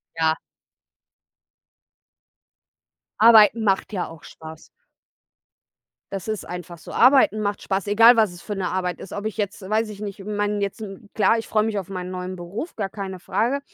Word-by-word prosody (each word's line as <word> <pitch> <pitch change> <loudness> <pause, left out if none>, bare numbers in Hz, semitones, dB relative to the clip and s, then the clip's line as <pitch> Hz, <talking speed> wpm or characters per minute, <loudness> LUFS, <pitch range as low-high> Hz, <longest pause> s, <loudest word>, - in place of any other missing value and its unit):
Ja. 160 0 +1 2.8
Arbeiten 225 0 +7
macht 195 0 +1
ja 185 -3 -2
auch 165 -2 -13
Spaß. 160 0 -12 1.4
Das 195 -1 -5
ist 215 -1 -3
einfach 175 -1 -8
so. - - -11
Arbeiten 255 -3 +5
macht 205 -1 -2
Spaß, 195 0 -2
egal 230 +4 +7
was 215 -5 +3
es 175 - -12
für 205 - -5
'ne 190 -2 -2
Arbeit 180 -1 -2
ist, - - -9
ob 205 - -5
ich 220 - -7
jetzt 205 -1 -3
weiß 220 +1 0
ich 210 0 -9
nicht 200 -1 -6
ich 195 - -10
meine 205 0 -1
jetzt, 200 +2 -3 0.3
klar, 215 +2 +3
ich 225 - -5
freue 215 -1 +2
mich 220 -2 -2
auf 190 -3 -4
meinen 185 -2 -5
neuen 185 0 -5
Beruf, 185 - -7
gar 200 -3 -3
keine 190 -2 -6
Frage, 230 +10 0
200 Hz, 175 wpm, -23 LUFS, 185-215 Hz, 2.8 s, Arbeiten